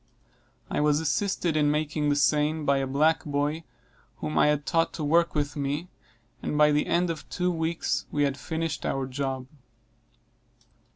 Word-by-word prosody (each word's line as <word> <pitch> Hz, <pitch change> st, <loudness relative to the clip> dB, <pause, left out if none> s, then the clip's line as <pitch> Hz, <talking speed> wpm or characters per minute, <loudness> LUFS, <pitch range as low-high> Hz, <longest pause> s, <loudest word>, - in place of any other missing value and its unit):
I -, -, -1 dB
was 150 Hz, 0 st, +3 dB
assisted 170 Hz, +1 st, 0 dB
in 150 Hz, -1 st, +3 dB
making 150 Hz, 0 st, 0 dB
the 145 Hz, -, +2 dB
seine 150 Hz, +2 st, +2 dB
by 140 Hz, -1 st, +3 dB
a 135 Hz, -, -1 dB
black 155 Hz, +4 st, +2 dB
boy, 150 Hz, +2 st, -1 dB, 0.5 s
whom 155 Hz, -, -5 dB
I -, -, +5 dB
had 150 Hz, -1 st, +1 dB
taught 165 Hz, 0 st, +1 dB
to 160 Hz, -, -4 dB
work 165 Hz, +3 st, +2 dB
with 145 Hz, -1 st, -1 dB
me; 145 Hz, +4 st, -2 dB, 0.5 s
and 150 Hz, -, -2 dB
by 150 Hz, 0 st, +6 dB
the 150 Hz, 0 st, +1 dB
end 175 Hz, 0 st, +2 dB
of 160 Hz, -, -8 dB
two 180 Hz, 0 st, 0 dB
weeks 165 Hz, 0 st, -1 dB
we 145 Hz, -, +1 dB
had 140 Hz, -1 st, +1 dB
finished 160 Hz, +2 st, -3 dB
our 135 Hz, -1 st, -1 dB
job. 130 Hz, 0 st, -3 dB
150 Hz, 170 wpm, -27 LUFS, 145-160 Hz, 0.5 s, by